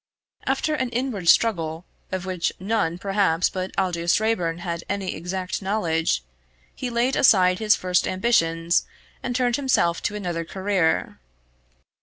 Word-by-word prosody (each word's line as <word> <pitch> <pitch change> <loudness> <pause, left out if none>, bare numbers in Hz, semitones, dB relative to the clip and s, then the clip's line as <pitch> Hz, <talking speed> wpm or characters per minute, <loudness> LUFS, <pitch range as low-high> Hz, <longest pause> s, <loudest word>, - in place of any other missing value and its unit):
After 310 - 0
an 260 -4 -1
inward 235 -8 -1
struggle, 165 -6 +2 0.3
of 185 0 -3
which 185 -3 -1
none 185 -4 0
perhaps 195 -3 +1
but 185 0 -3
Aldous 175 -1 +1
Raeburn 180 -7 0
had 170 -1 -4
any 195 -1 -2
exact 185 +2 -4
knowledge, 165 - 0 0.5
he 255 - -4
laid 240 +3 +1
aside 185 -7 +5
his 215 -1 +4
first 180 -1 +1
ambitions 170 -5 +1 0.3
and 245 - -3
turned 245 -2 +1
himself 260 -11 +1
to 210 - -2
another 175 -5 -3
career. 190 -1 0
185 Hz, 135 wpm, -24 LUFS, 170-220 Hz, 0.5 s, aside